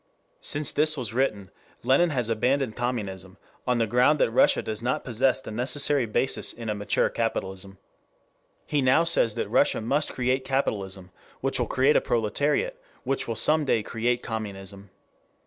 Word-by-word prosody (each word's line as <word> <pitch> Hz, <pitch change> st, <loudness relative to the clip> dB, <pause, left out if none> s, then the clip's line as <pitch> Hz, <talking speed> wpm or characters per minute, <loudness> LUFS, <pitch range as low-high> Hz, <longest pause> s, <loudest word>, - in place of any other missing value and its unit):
Since 145 Hz, 0 st, +2 dB
this 155 Hz, +1 st, +1 dB
was 120 Hz, -5 st, -4 dB
written 105 Hz, -7 st, -1 dB, 0.3 s
Lenin 135 Hz, +8 st, +3 dB
has 125 Hz, -7 st, -1 dB
abandoned 125 Hz, +1 st, 0 dB
communism 100 Hz, -7 st, -4 dB, 0.3 s
on 125 Hz, -1 st, +2 dB
the 115 Hz, -, +2 dB
ground 125 Hz, +7 st, +3 dB
that 115 Hz, -, +1 dB
Russia 115 Hz, -, +3 dB
does 110 Hz, 0 st, -5 dB
not 125 Hz, +2 st, -1 dB
possess 125 Hz, +2 st, +1 dB
the 130 Hz, -, -9 dB
necessary 135 Hz, +2 st, +1 dB
basis 120 Hz, +5 st, -1 dB
in 115 Hz, -2 st, -7 dB
a -, -, 0 dB
mature 105 Hz, 0 st, 0 dB
capitalism. 95 Hz, -4 st, -4 dB, 0.9 s
He 145 Hz, -2 st, 0 dB
now 130 Hz, +5 st, +4 dB
says 165 Hz, -10 st, +2 dB
that -, -, -2 dB
Russia -, -, +2 dB
must 140 Hz, +7 st, 0 dB
create 130 Hz, +1 st, 0 dB
capitalism, 100 Hz, -9 st, -3 dB, 0.3 s
which -, -, 0 dB
will -, -, 0 dB
create 135 Hz, +3 st, +2 dB
a -, -, +4 dB
proletariat, 145 Hz, -, -1 dB, 0.2 s
which 135 Hz, +1 st, -2 dB
will 115 Hz, -, -3 dB
some 155 Hz, +7 st, +4 dB
day 115 Hz, -6 st, +1 dB
create 120 Hz, +3 st, -1 dB
communism. 100 Hz, -3 st, -7 dB
120 Hz, 165 wpm, -25 LUFS, 105-135 Hz, 0.9 s, now